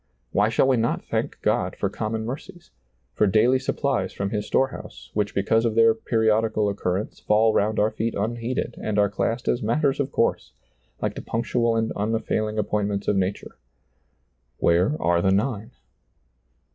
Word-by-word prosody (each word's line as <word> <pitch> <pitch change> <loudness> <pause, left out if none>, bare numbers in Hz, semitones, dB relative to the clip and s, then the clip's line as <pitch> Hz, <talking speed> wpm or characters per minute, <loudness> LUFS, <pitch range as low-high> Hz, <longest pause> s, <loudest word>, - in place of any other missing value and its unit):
Why 105 +1 +3
shall 125 - +2
we 130 -2 +3
not 115 +1 -1
thank - - -3
God - - +1
for - - -1
common 110 +1 -3
mercies, 175 +8 -8 0.4
for 105 - +2
daily 120 +6 +4
suppUes 135 -7 -1
from 100 0 -2
His 105 -1 -2
store 135 - +2
house, - - -11
which 105 -1 -1
because 110 +3 +2
of 115 -2 0
their 115 0 +6
periodical 110 -1 +1
occur 95 -2 -1
rence - - -14
fall 110 +1 +3
round 105 +1 +1
our 105 +1 +2
feet 115 +1 -2
unheeded 115 +4 -2
and 105 -1 -2
are 100 -1 +3
classed 115 +4 -2
as 120 - +1
matters 135 +5 +1
of 140 -1 -1
course, 115 - 0 0.2
— - - -38
like - - 0
the - - -7
punctual 115 0 0
and 115 0 0
unfailing 110 0 -1
appointments 105 -1 -1
of - - +2
nature. 95 +1 -2 0.5
" - - -46
Where 90 - +2
are 85 0 +2
the 95 - +2
nine 105 +2 0
110 Hz, 175 wpm, -24 LUFS, 100-115 Hz, 0.5 s, their